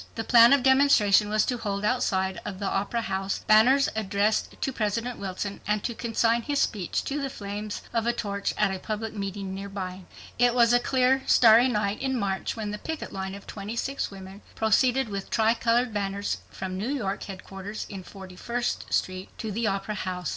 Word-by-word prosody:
The 225 - -3
plan 235 0 +7
of 280 -2 +4
demonstration 265 -7 +5
was 215 0 +2
to 245 -2 -2
hold 200 -1 -2
outside 190 -6 0
of 195 - -6
the 200 - -4
Opera 205 +4 -1
House 195 -2 -2
banners 250 +6 +5
addressed 210 0 0
to 270 - -2
President 230 +2 -2
Wilson, 195 +1 -5
and 210 -1 0
to 240 - -2
consign 230 0 +1
his 285 +4 -1
speech 195 -6 -1
to 285 +1 -3
the 275 - -2
flames 205 -2 -6
of 230 0 0
a - - +4
torch 205 -4 -2
at 210 -2 +2
a 190 - -4
public 215 +2 -4
meeting 195 -2 -4
nearby. 190 -2 -6 0.3
It 245 0 +4
was 235 -1 +5
a 245 - +6
clear 260 +1 +2
starry 230 +1 +7
night 210 -4 -1
in 265 -1 0
March 195 -3 -2
when 215 -2 -4
the 210 - -5
picket 320 +4 -5
line 190 0 -4
of 200 - -11
26 230 +7 -4
women 195 0 -11
proceeded 250 +4 +2
with 200 -2 -5
tri 220 0 +3
colored 235 0 +1
banners 200 0 -2
from 185 0 -5
New 220 +6 -2
York 215 -9 -2
headquarters 195 +2 -7
in 195 -2 -7
Forty 190 0 -11
first 240 +5 -3
street 185 0 -1
to 220 - -4
the 225 +2 -1
Opera 195 +1 -2
House. 185 -3 -4
210 Hz, 190 wpm, -26 LUFS, 195-235 Hz, 0.3 s, plan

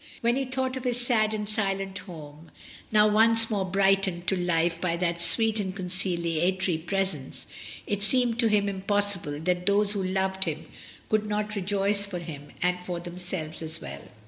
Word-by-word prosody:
When 235 +1 +2
he 270 0 -1
thought 260 0 -2
of 260 - -6
his 245 -1 -1
sad 230 -3 +1
and 210 -1 -3
silent 195 -2 -1
home, 155 -3 -11 0.4
now 210 -1 +5
once 225 +2 +4
more 200 -3 0
brightened 195 -1 +2
to 195 - +1
life 170 -1 0
by 170 -2 0
that 170 -1 -1
sweet 225 +3 +6
and 190 -2 -3
conciliatory 180 -1 -1
presence, 175 -5 -3 0.4
it 205 -1 -2
seemed 240 +2 +1
to 235 - +4
him 210 -2 +2
impossible 195 -6 0
that 180 +1 -1
those 205 0 +3
who 205 -2 -1
loved 190 0 -1
him 160 -1 -4 0.5
should 215 -1 +1
not 210 0 -2
rejoice 200 +1 +2
for 200 -3 -4
him 155 -4 -8 0.2
and 180 0 +1
for 180 -1 -5
themselves 175 -2 -5
as 160 -1 -3
well. 70 +1 -8
195 Hz, 170 wpm, -26 LUFS, 175-210 Hz, 0.5 s, sweet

